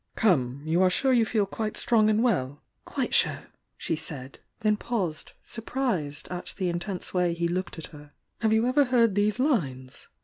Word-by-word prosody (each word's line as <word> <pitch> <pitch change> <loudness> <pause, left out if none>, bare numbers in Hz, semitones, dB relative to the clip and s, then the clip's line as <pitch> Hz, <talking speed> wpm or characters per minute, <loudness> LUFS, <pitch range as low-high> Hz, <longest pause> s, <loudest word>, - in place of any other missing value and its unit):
"Come! 140 - +1
You 165 +3 +2
are 185 - +5
sure 265 +8 +2
you 235 -2 +4
feel 215 -3 0 0.3
strong 215 -2 +4
and 215 +2 +2
well?" 145 - 0 0.2
"Quite - - -3
sure!" - - +1 0.3
she 165 - -2
said, 140 -4 -7 0.2
then 215 -1 +3
paused, 195 -8 -3
surprised 225 - -2
at 180 0 -5
the 185 -3 0
intense 175 +2 -3
way 180 -2 +1
he 170 0 0
looked 175 +1 -3
at 160 - -4
her. 145 -1 -13 0.3
"Have 220 -1 +1
you 220 +1 +3
ever 270 +3 +3
heard 235 -4 +3
these 205 +2 +1
lines?" 140 - -1
185 Hz, 175 wpm, -27 LUFS, 155-225 Hz, 0.3 s, are